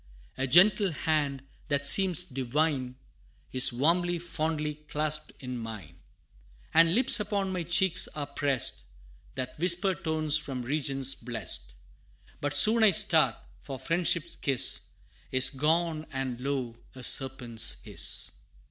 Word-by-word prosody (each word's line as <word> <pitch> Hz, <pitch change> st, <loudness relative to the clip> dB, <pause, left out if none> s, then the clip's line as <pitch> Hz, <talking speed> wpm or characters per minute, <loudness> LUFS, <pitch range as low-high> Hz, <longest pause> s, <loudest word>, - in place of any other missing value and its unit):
A 135 Hz, -, -3 dB
gentle 190 Hz, -, +4 dB
hand, 145 Hz, -4 st, -2 dB, 0.2 s
that 140 Hz, -2 st, -1 dB
seems 180 Hz, +3 st, +6 dB
divine, 135 Hz, -2 st, -3 dB, 0.6 s
Is 130 Hz, -1 st, +6 dB
warmly, 170 Hz, +7 st, 0 dB
fondly 155 Hz, -2 st, -4 dB, 0.2 s
clasped 155 Hz, 0 st, -2 dB
in 125 Hz, -2 st, -7 dB
mine; 100 Hz, -8 st, -10 dB, 0.7 s
And 165 Hz, +2 st, +4 dB
lips 250 Hz, 0 st, +5 dB
upon 200 Hz, -2 st, -3 dB
my 180 Hz, -, -3 dB
cheeks 175 Hz, +2 st, +2 dB
are 145 Hz, -1 st, -4 dB
pressed, 140 Hz, -3 st, -1 dB, 0.5 s
That 130 Hz, +1 st, -7 dB
whisper 180 Hz, +3 st, +3 dB
tones 155 Hz, -3 st, 0 dB
from 135 Hz, -4 st, -5 dB
regions 135 Hz, 0 st, -1 dB
blest: 115 Hz, -, -4 dB, 0.6 s
But 145 Hz, 0 st, -1 dB
soon 220 Hz, +8 st, +6 dB
I 220 Hz, -, +6 dB
start 185 Hz, -, +3 dB, 0.3 s
for 135 Hz, -, -8 dB
friendship's 170 Hz, +4 st, -1 dB
kiss 135 Hz, -3 st, 0 dB, 0.4 s
Is 130 Hz, 0 st, +4 dB
gone, 155 Hz, +3 st, -1 dB
and 130 Hz, -2 st, -5 dB
lo! 130 Hz, -4 st, -4 dB, 0.2 s
a 130 Hz, -, -11 dB
serpent's 120 Hz, -4 st, -1 dB
hiss. -, -, -4 dB
150 Hz, 125 wpm, -27 LUFS, 130-170 Hz, 0.7 s, seems